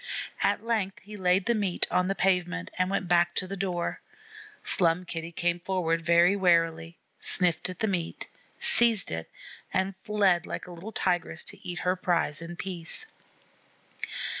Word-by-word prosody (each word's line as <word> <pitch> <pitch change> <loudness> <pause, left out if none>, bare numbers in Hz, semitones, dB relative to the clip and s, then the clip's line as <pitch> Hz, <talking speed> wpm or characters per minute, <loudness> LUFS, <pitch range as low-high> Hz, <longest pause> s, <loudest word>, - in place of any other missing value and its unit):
At - - +1
length 215 -5 0
he 210 +2 -10
laid 185 -1 +2
the 235 - +3
meat 200 -5 0
on 180 0 +2
the 195 - 0
pavement, 180 -2 +1
and 185 0 +2
went 195 -1 -1
back 175 0 +3
to - - 0
the 195 +2 -5
door. 180 -3 -2 0.6
Slum 175 0 +2
Kitty 165 -1 -5
came 175 +1 0
forward 170 -2 0
very 170 +3 +5
warily; 165 -3 +2 0.2
sniffed 180 -1 0
at 180 - -8
the 220 - +2
meat, 175 -5 -2 0.3
seized 230 -5 +4
it, 80 0 -4 0.4
and 190 +1 0
fled 195 -5 +2
like - - -5
a 180 - -10
little 175 +6 -8
Tigress 175 -5 -1
to - - -6
eat 175 0 -4
her 180 +1 +3
prize 170 -4 0
in 170 +1 -7
peace. 180 - -4
180 Hz, 165 wpm, -28 LUFS, 170-195 Hz, 0.6 s, very